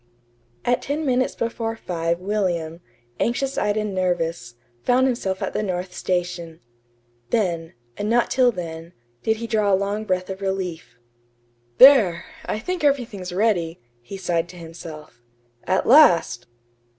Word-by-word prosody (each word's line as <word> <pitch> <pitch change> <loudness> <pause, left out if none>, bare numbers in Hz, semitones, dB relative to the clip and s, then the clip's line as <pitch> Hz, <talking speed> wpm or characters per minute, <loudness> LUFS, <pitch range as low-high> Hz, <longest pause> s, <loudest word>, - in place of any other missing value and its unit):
At 245 0 +2
ten 300 +3 -2
minutes 255 -1 +1
before 230 -1 -2
five 170 -5 -2
William, 180 -4 -2 0.4
anxious 265 +3 0
eyed 210 0 0
and 210 -2 -2
nervous, 170 -9 -1 0.3
found 250 - +3
himself 200 -7 -1
at - - -3
the - - -1
North 180 -2 -3
Station. 175 -2 -3 0.7
Then, 170 -7 -1 0.2
and 205 - -2
not 240 +1 +2
till 250 -1 +4
then, 165 -3 -7 0.3
did 220 0 +1
he 230 - -5
draw 215 -3 +1
a - - +6
long 200 +2 -2
breath 185 -1 -1
of 190 +1 -7
relief. 180 -10 -4 0.8
"There! 230 -11 +7 0.2
I - - -1
think 350 +10 -4
everything's 240 -10 0
ready," 180 -4 0 0.2
he 160 +12 -8
sighed 175 -2 -1
to - - -12
himself. 160 -6 -10 0.5
"At 190 - +1
last!" 175 - +5
190 Hz, 140 wpm, -23 LUFS, 170-225 Hz, 0.8 s, There